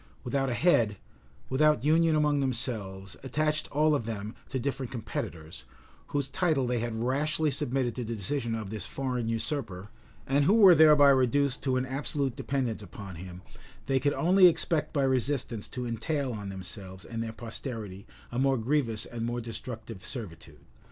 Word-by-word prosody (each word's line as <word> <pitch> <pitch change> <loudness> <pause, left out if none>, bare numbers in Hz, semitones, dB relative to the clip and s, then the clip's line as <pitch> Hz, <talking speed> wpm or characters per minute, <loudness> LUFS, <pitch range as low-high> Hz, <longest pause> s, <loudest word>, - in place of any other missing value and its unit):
Without 135 +1 0
a 120 - -1
head, 115 - +3 0.5
without 150 +3 +3
union 160 +2 +4
among 150 -1 +2
themselves, 110 -7 -2
attached 155 +3 -1
all 155 +2 +3
of 140 -6 0
them 110 -1 -5 0.2
to - - -2
different 135 -1 -3
competitors, 85 -8 -6 0.4
whose 140 -2 -1
title 150 -1 +1
they 120 -1 0
had 115 0 -3
rashly 150 +4 +1
submitted 125 -2 -1
to 125 - -4
the 115 0 -4
decision 115 +2 -2
of 110 -3 -5
this 105 -4 -4
foreign 125 -4 -2
usurper, 115 -4 -3 0.4
and 140 +2 +2
who 200 - +5
were 200 -5 +9
thereby 150 -2 +7
reduced 135 +1 +2
to 130 -1 +1
an 130 - 0
absolute 135 -1 -2
dependence 125 -6 -2
upon 100 0 -9
him, 90 +1 -9 0.4
they 135 -1 +2
could 145 +2 +1
only 185 +2 +6
expect 165 -2 +2
by 140 - +1
resistance 130 -4 0
to 125 -1 -5
entail 125 +3 -2
on 100 -2 -6
themselves 95 0 -8
and 115 -1 -5
their 115 -1 -3
posterity 110 -4 -6 0.2
a 120 - -2
more 135 0 +3
grievous 115 -2 0
and 115 -1 -6
more 120 +1 -2
destructive 115 -3 -7
servitude. 105 - -7
125 Hz, 165 wpm, -29 LUFS, 110-145 Hz, 0.5 s, were